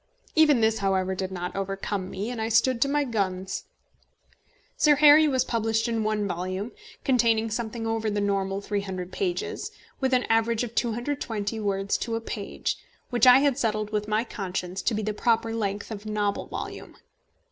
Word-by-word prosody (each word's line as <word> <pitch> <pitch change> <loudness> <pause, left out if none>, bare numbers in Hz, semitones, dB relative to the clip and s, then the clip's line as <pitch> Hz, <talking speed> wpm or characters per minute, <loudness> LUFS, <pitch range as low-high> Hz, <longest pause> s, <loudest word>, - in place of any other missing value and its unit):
Even 300 -6 +5
this, 220 0 +2
however, 190 -1 +1
did 190 0 -3
not 180 -1 -4
overcome 195 0 -3
me, 205 +6 -4
and 235 -3 -4
I 220 - -1
stood 230 +2 +3
to 275 - +3
my 290 +1 +2
guns. 190 -6 -2 1.1
Sir 300 -1 +5
Harry 300 +1 +7
was 260 -3 +1
published 225 0 0
in 230 -2 0
one 210 -1 0
volume, 185 +4 -3 0.3
containing 230 -4 +2
something 225 0 -3
over 225 -1 -1
the 205 0 -1
normal 195 -1 0
300 190 -3 -4
pages, 415 +3 -2 0.3
with 265 -1 +1
an 250 - +2
average 225 +1 +1
of 235 -1 -5
220 230 -3 -2
words 200 -1 0
to 230 0 -2
a - - -1
page, 215 -2 -4 0.3
which 245 +1 +4
I 250 +2 +9
had 280 -2 +2
settled 215 -3 -1
with 210 -1 -1
my 215 +1 +1
conscience 190 -4 -4
to 225 - 0
be 215 - -2
the 215 +1 -1
proper 230 +1 +1
length 205 -1 -3
of 215 0 -6
a - - -4
novel 205 -1 -1
volume. - - -7
220 Hz, 180 wpm, -26 LUFS, 200-235 Hz, 1.1 s, I